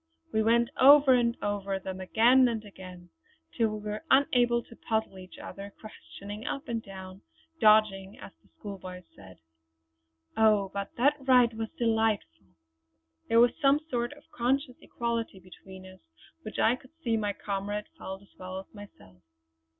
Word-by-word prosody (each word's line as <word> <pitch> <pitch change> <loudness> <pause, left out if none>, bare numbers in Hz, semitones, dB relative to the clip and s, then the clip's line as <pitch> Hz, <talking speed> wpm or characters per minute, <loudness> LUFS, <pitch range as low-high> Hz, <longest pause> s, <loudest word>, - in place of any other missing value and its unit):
We 220 - +2
went 235 +3 +2
over 280 0 +8
and 235 -1 +2
over 200 -1 -2
them 190 0 -7
again 240 +7 +4
and 225 -2 -3
again, 185 -3 -12 0.4
till 220 -3 0
we 210 - -9
were 210 - -5
unable 245 -3 +3
to 230 - -16
puzzle 220 -5 -3
each 185 0 -13
other 200 +1 -9
questioning 210 -1 -10
up 275 - -4
and 230 -1 -2
down, 190 -1 -11 0.4
'dodging' 210 -3 +3
as - - -11
the - - -28
school 200 -2 -9
boys 180 0 -9
say. 95 -2 -14 1.0
Oh, 210 -3 +3
but 200 0 -5
that 285 +5 +3
ride 250 -3 +4
was 225 0 -4
delightful! 220 - 0 0.8
There 230 - +5
was 240 0 +6
some 275 +1 +4
sort 240 +2 -1
of 290 0 -18
conscious 255 +2 -1
equality 230 -4 -3
between 185 +1 -14
us 185 0 -14 0.4
which 215 - -8
I 235 +3 +3
could 260 +4 -21
see 230 -2 +1
my 205 -2 -1
comrade 205 +1 -4
felt 190 +1 -8
as 200 - -24
well 185 0 -7
as 190 - -14
myself. 145 - -15
215 Hz, 160 wpm, -28 LUFS, 195-235 Hz, 1.0 s, over